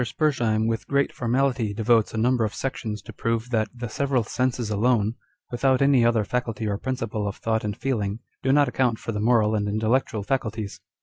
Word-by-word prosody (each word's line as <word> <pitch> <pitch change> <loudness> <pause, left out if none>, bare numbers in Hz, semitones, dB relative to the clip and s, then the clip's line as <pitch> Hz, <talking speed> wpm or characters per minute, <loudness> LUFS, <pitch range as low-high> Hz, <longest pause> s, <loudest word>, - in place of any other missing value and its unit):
Spurzhcim 120 -5 +1
with 115 0 -2
great 140 0 +1
formality 125 -3 0
devotes 115 0 +3
a - - -5
number 120 +1 +2
of 105 - -2
sections 110 -6 -4
to - - -10
prove 115 +1 -2
that 110 -2 +1
the 120 0 -6
several 135 +1 0
senses 125 -1 -1
alone, 110 0 +2 0.4
without 130 +1 +2
any 140 -3 +4
other 115 -2 +3
faculty 115 -2 -2
or 100 -1 -1
principle 115 -5 -3
of 100 - -3
thought 110 -1 -1
and 105 -1 -3
feeling, 105 -6 -1 0.2
do 130 - +1
not 145 0 +5
account 125 -2 +1
for 115 - -5
the 105 - -3
moral 110 -1 +3
and 105 -1 0
intellectual 110 0 0
faculties. 110 -4 -3
115 Hz, 190 wpm, -25 LUFS, 110-125 Hz, 0.4 s, not